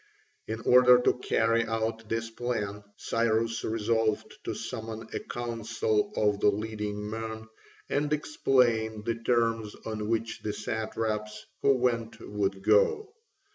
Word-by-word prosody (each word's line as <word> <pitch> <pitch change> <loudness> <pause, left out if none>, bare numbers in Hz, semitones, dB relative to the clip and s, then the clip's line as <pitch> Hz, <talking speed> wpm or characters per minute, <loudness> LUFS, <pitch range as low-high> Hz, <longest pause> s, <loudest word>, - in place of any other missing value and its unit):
In 110 +1 -4
order 125 +1 +7
to 125 - +2
carry 115 -1 +2
out 115 0 -2
this 115 0 -2
plan, 105 -4 -3
Cyrus 115 0 0
resolved 110 0 0
to - - -2
summon 110 0 -6
a - - -1
council 115 -2 -1
of 105 -1 +2
the 105 - +5
leading 105 0 -3
men 110 0 -5 0.4
and 145 +1 0
explain 120 -7 +2
the 115 +1 -2
terms 115 -3 +1
on 110 -1 -3
which 115 0 -1
the 105 - -2
satraps 110 -1 -3 0.2
who 140 - +5
went 120 -3 0
would 100 -2 -2
go. 110 - +3
110 Hz, 130 wpm, -29 LUFS, 105-115 Hz, 0.4 s, order